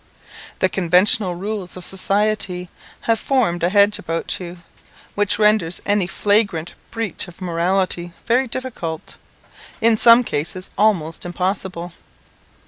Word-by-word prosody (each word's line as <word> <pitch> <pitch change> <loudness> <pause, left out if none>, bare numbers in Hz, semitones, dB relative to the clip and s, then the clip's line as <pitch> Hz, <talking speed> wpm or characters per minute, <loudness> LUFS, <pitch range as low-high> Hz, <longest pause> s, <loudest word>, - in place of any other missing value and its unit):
The 185 - +2
conventional 185 +2 +3
rules 195 0 -5
of 180 - -3
society 195 -2 0 0.3
have 225 -1 0
formed 230 -12 0
a 170 - +2
hedge 205 +1 +3
about 165 0 -2
you, 180 -1 -8 0.6
which 205 0 +2
renders 210 -5 +2
any 205 -3 +1
flagrant 200 -4 +1 0.2
breach 225 -6 -4
of 175 +1 -14
morality 175 0 0
very 255 +3 +2
difficult, 225 -11 -6 0.6
in 230 -1 +4
some 235 +2 +7
cases 185 0 -3
almost 180 -7 0
impossible. 180 -1 -4
190 Hz, 120 wpm, -19 LUFS, 175-215 Hz, 0.6 s, some